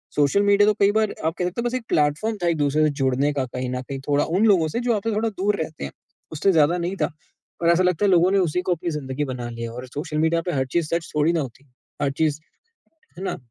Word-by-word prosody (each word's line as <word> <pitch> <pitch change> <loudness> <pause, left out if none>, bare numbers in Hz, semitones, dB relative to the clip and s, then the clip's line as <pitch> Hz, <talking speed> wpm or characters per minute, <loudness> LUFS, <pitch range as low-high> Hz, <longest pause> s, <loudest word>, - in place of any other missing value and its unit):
Social 150 +8 +3
media 205 +1 +4
तो - - +3
कई 200 - +5
बार 215 0 +1
आप 160 - +1
कह 180 - +1
सकते 180 +6 -2
हो - - -4
बस 240 - -2
एक 255 - -3
प्लेटफॉर्म 155 +10 +1
था - - +2
एक-दूसरे 155 -2 +2
से 155 - +4
जुड़ने 135 +2 +1
का 135 -2 -1
कहीं 125 0 -4
न 125 0 -3
कहीं, 135 +1 -6
थोड़ा 145 0 +3
उन 190 +7 +1
लोगों 180 -7 +4
से 195 - -2
जो 235 - +4
आपसे 220 +2 -1
थोड़ा 225 +2 +1
दूर 205 0 -1
रहते 155 - -9
हैं, 70 - -5 0.4
उससे 160 +6 +2
ज़्यादा 165 0 +3
नहीं 175 +2 -2
था। - - +1 0.5
और 170 - +3
ऐसा 170 +2 +4
लगता 180 +2 +2
है 195 - +3
लोगों 180 +1 +4
ने 200 - +3
उसी 180 +4 -1
को 180 -1 0
अपनी 175 +1 -4
ज़िंदगी 145 -1 -3
बना 120 -1 -5
लिया 115 0 -6
और 125 +1 -7
सोशल 150 +3 -5
मीडिया 160 +2 +2
पे - - +1
हर 135 -2 0
चीज़ 170 -3 +1
सच 170 -1 -4
थोड़ी 150 +3 +3
ना 165 - +1
होती, 135 +1 -9 0.3
हर 140 -1 +1
चीज़। 150 0 0 0.8
है 190 - -6
ना? - - -2
160 Hz, 265 wpm, -23 LUFS, 145-190 Hz, 0.8 s, कई